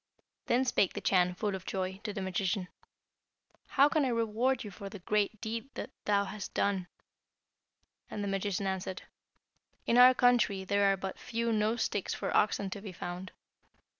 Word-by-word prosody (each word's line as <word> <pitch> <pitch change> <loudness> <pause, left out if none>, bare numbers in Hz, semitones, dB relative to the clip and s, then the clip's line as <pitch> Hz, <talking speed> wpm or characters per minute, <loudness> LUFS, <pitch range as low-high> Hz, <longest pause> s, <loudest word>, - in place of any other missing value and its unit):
Then 250 +2 +3
spake 200 -7 +2
the - - -4
Chan, 180 -1 +2
full 205 +1 -1
of 190 -1 -5
joy, 190 0 -3
to 210 - -2
the 200 -2 -4
magician, 190 0 -1 1.0
'How 280 - +5
can 300 0 +2
I - - +2
reward 230 +2 +1
you 210 - -7
for 195 +1 -8
the 205 - -8
great 210 +3 0
deed 230 +3 -4
that - - -5
thou 200 -1 +3
hast 205 0 -7
done?' 195 -3 0 1.2
And 205 - -4
the - - -2
magician 195 0 -1
answered, 190 -1 -3 0.8
'In 235 - +4
our 255 +1 +9
country 240 -6 +3
there 200 +1 +3
are 195 - 0
but 190 0 -5
few 230 0 -1
nose 220 +2 +1
sticks 205 - -2
for - - -3
oxen 200 -2 +2
to 200 - -5
be 200 -2 -7
found. 180 +1 -6
200 Hz, 175 wpm, -31 LUFS, 190-225 Hz, 1.2 s, our